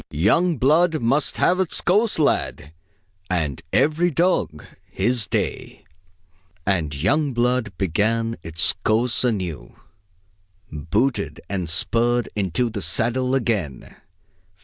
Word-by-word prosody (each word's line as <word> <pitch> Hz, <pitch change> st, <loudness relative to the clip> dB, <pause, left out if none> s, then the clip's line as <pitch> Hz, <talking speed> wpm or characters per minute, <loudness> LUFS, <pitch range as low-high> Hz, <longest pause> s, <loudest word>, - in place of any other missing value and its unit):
Young 135 Hz, -, +2 dB
blood 155 Hz, +5 st, +3 dB
must 135 Hz, +5 st, 0 dB
have 180 Hz, +1 st, +2 dB
its 185 Hz, -3 st, +1 dB
course, 210 Hz, +5 st, +2 dB
lad, 110 Hz, -, -1 dB, 0.6 s
And 80 Hz, -7 st, -1 dB
every 160 Hz, +4 st, +2 dB
dog 170 Hz, -, 0 dB, 0.2 s
his 115 Hz, +3 st, 0 dB
day!" -, -, -4 dB, 0.8 s
And 85 Hz, -7 st, 0 dB
young 135 Hz, -, 0 dB
blood 120 Hz, -4 st, 0 dB
began 115 Hz, +5 st, 0 dB
its 80 Hz, 0 st, 0 dB
course 115 Hz, +3 st, +2 dB
anew. 90 Hz, -, -3 dB, 1.0 s
Booted 80 Hz, -, -1 dB
and 90 Hz, -4 st, -3 dB
spurred, 120 Hz, +7 st, +1 dB
into 105 Hz, +4 st, -1 dB
the 105 Hz, -2 st, -5 dB
saddle 125 Hz, +5 st, 0 dB
again! 105 Hz, -, -3 dB
115 Hz, 105 wpm, -22 LUFS, 90-135 Hz, 1.0 s, blood